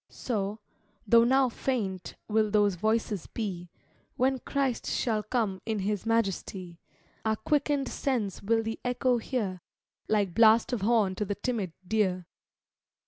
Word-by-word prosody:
So, 210 -3 -3 0.5
though 230 +2 +6
now 265 +2 +4
faint, 220 -7 -3
will 215 0 +2
those 205 -1 +3
voices 215 0 -1
be, 185 -6 -5 0.5
When 265 0 +1
Christ 270 -2 -1
shall 220 -3 0
come 210 -5 -1
in 220 -1 -2
His 205 +1 -2
majesty; 195 -5 -1 0.4
Our 220 0 +1
quicken'd 290 +1 0
sense 235 -8 -2
will 225 +2 +1
the 225 0 -4
echo 250 0 +1
hear, 210 -7 -3 0.5
Like 205 -4 +1
blast 225 +3 +5
of 235 - -1
horn 210 -2 +3
to - - 0
the 205 - -2
timid 205 -6 -2
deer. 185 -4 +1
220 Hz, 140 wpm, -29 LUFS, 195-240 Hz, 0.5 s, though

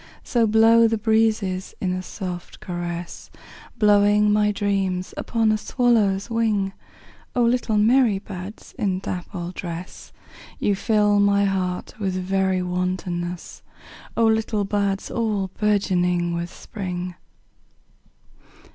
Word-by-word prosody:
So 235 -2 +2
blow 225 +1 +6
the 225 0 0
breezes 215 -4 +1
in 185 -1 -1
a 185 - -2
soft 180 -2 -7
caress, 175 -1 -6 0.5
Blowing 210 -1 +4
my 210 0 +3
dreams 195 -3 -1
upon 225 -2 +1
a 215 - +1
swallow's 210 -6 +2
wing;O 225 +1 -3
little 235 -2 +1
merry 225 0 +4
buds 195 +1 -9
in 190 -3 0
dappled 180 -1 -5
dress, 175 0 -7 0.5
You 205 - +1
fill 210 0 +2
my 200 0 +3
heart 185 -2 -2
with 190 -3 -1
very 190 0 0
wantonness—O 180 +4 -4
little 220 -2 +1
buds 200 -1 -1
all 210 -5 -1
bourgeoning 180 -4 +1
with 170 +1 -3
Spring! 180 -4 -5
200 Hz, 110 wpm, -23 LUFS, 185-215 Hz, 0.5 s, blow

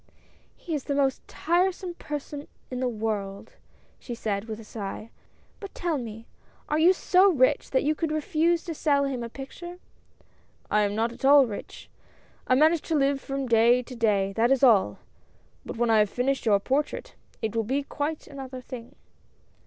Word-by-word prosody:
" - - -33
He 335 - -6
is 290 -4 -2
the 280 - -1
most 275 -2 +1
tiresome 360 +2 0
person 295 -2 -6 0.2
in 250 - -3
the 255 -1 0
world," 210 -3 -4 0.5
she 240 - -6
said, 205 -3 -2
with 220 -1 -6
a - - -10
sigh. 215 +1 -7 0.2
" - - -35
But 400 - -9
tell 335 -5 -1
me, 225 -2 -8 0.4
are 300 - 0
you 340 +3 +7
so 380 +1 +4
rich 260 -6 +2
that 260 - +1
you 300 +2 +2
could 315 0 -2
refuse 325 +2 +1
to 335 - -5
sell 285 -2 +2
him 270 -3 -2
a 235 - -5
picture? 340 +8 -9 0.5
" - - -35
"I 210 - +4
am 205 0 0
not 225 +2 0
at 235 - -13
all 280 0 +7
rich 210 -4 -8 0.3
— - - -32
I 255 - +4
manage 310 +3 +4
to 320 - +2
live 275 -1 +2
from 275 0 -3
day 235 +1 +4
to 250 - -10
day, 200 -4 +1
that 230 +3 +2
is 270 0 +2
all! 205 - +5 0.7
But - - -7
when 235 0 +2
I 220 - +5
have 210 -1 +3
finished 255 +2 -1
your 205 -2 +5
portrait, 270 +8 -2 0.3
it 220 0 -2
will 225 - +1
be 270 +6 -1
quite 295 +2 -4
another 265 -2 -8
thing." 245 -2 -9
260 Hz, 195 wpm, -26 LUFS, 225-300 Hz, 0.7 s, you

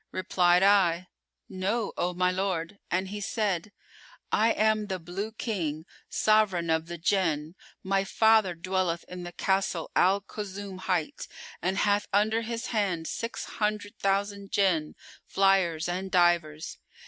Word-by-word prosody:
Replied 180 -1 +3
I, 185 -3 +3 0.4
'No, 200 +4 -2
O 180 - 0
my 180 0 +2
lord'; 185 0 -2
and 185 +1 -1
he 205 +1 -5
said, 205 -3 -1 0.6
'I 225 +2 +3
am 215 0 +2
the 190 -2 -2
Blue 185 +5 -5
King, 165 -9 -3 0.2
Sovran 195 -6 +2
of 160 0 0
the 170 0 -6
Jann; 165 -3 0 0.3
my 195 0 +1
father 220 -2 +3
dwelleth 180 -1 -1
in 180 0 -7
the 175 0 -7
Castle 190 -2 -1
Al 195 +2 +4
Kulzum[FN#419] 200 -2 -7
hight, 180 -4 -2 0.3
and 190 +2 -1
hath 205 0 +2
under 215 +3 +2
his 230 +1 -4
hand 190 -7 0
six 230 +7 -4
hundred 210 0 -2
thousand 200 0 -1
Jinn, 180 -6 +1 0.3
flyers 190 -4 +2
and 185 +2 -3
divers. 175 -4 +1
190 Hz, 135 wpm, -28 LUFS, 175-205 Hz, 0.6 s, Al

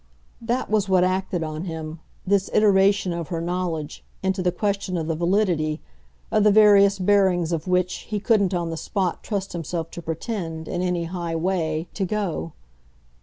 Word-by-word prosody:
That 240 +2 -1
was 210 -2 +1
what 185 -1 +4
acted 185 -2 0
on 155 +2 -4
him, 160 -2 -6 0.3
this 195 0 +2
iteration 200 -3 +4
of 170 -2 -4
her 170 -2 -3
knowledge, 170 -3 -3 0.2
into 190 0 0
the 180 0 +2
question 195 -1 -1
of 160 - -2
the 165 - -1
validity, 170 -3 +1 0.5
of 215 - +3
the 210 - +6
various 200 -1 +6
bearings 185 -3 +2
of 165 +1 -2
which, 180 0 +1 0.2
he 210 -1 -1
couldn't 200 -4 +2
on 170 -1 -2
the 165 - -4
spot 185 0 -2
trust 200 -3 -3
himself 165 0 -4
to 170 - -7
pretend, 165 -1 -4
in 175 - -2
any 180 -2 0
high 170 -1 -4
way, 165 -2 -1
to 200 - -2
go. 185 -5 -2
180 Hz, 170 wpm, -23 LUFS, 165-200 Hz, 0.5 s, the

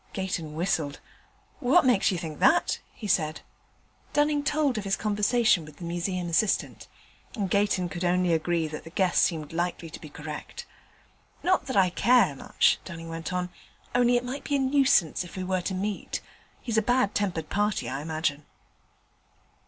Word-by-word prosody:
Gayton 175 -5 -3
whistled. 160 -4 -1 0.6
'What 265 +7 +4
makes 245 -6 +4
you 185 - -1
think 160 -3 -6
that?' 350 - +3
he 220 - -10
said. 155 -5 +1 0.7
Dunning 295 0 +2
told 285 -4 +1
of - - -5
his 195 0 +1
conversation 210 -2 +2
with 150 -1 -13
the - - -10
Museum 175 +1 -2
assistant, 180 +5 0 0.5
and 200 -6 -2
Gayton 200 -3 +2
could 175 0 -5
only 180 0 +2
agree 165 0 0
that 155 0 -7
the 165 - -10
guess 185 +1 +2
seemed 160 -2 0
likely 170 -1 -2
to - - -9
be 155 - -9
correct. 150 0 -8 0.8
'Not 370 -7 +2
that 260 - -1
I 185 -2 +4
care 215 - +4
much,' - - +2
Dunning 165 -2 -8
went 165 +1 -5
on, 180 0 -2 0.4
'only 245 0 +4
it 245 - -2
might 260 +3 -5
be 285 - -1
a - - +2
nuisance 265 - +3
if 180 - -11
we 185 - -3
were 185 0 0
to 190 +2 -3
meet. 200 +2 -3 0.4
He's 225 -3 +1
a - - +1
bad 245 -2 +2
tempered 175 -6 -1
party, 210 0 0
I 135 - -3
imagine.' 155 -2 -2
185 Hz, 175 wpm, -27 LUFS, 165-225 Hz, 0.8 s, What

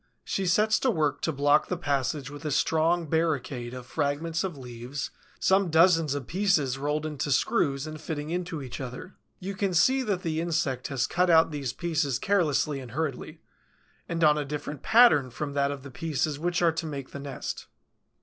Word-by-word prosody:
She 195 -1 -2
sets 215 +5 +3
to 265 - +1
work 155 - 0
to 160 - 0
block 145 +1 +3
the 180 - -2
passage 140 -2 -1
with 145 +2 -9
a 155 - -2
strong 160 +4 +2
barricade 145 -6 -1
of 125 -1 -8
fragments 155 +5 -1
of 180 -6 -4
leaves, 125 +2 -6 0.3
some 190 -1 +3
dozens 165 -2 +4
of 140 -3 -4
pieces 160 -8 +1
rolled 150 +2 -1
into 150 -2 -3
screws 135 +1 +1
and 155 0 -7
fitting 155 -1 -4
into 175 -4 -3
each 125 +1 -7
other. 125 +8 -7 0.3
You 195 +2 -5
can 195 -2 -1
see 260 +10 +4
that 205 -6 -2
the 160 -2 -1
insect 160 -7 -1
has 135 -2 0
cut 180 +1 +1
out 165 -1 +5
these 140 -4 -3
pieces 155 -3 -1
carelessly 150 -5 +1
and 125 -3 -10
hurriedly, 150 -3 -4 0.7
and 165 0 -1
on 150 -1 +5
a - - -1
different 145 0 -5
pattern 220 - +5
from 140 +4 -5
that 140 0 +1
of 140 -2 -5
the 140 - -9
pieces 150 -1 -2
which 175 +2 0
are 170 - +5
to 160 +1 -4
make 140 -3 -6
the 140 - -7
nest. 140 0 -6
150 Hz, 190 wpm, -27 LUFS, 140-170 Hz, 0.7 s, out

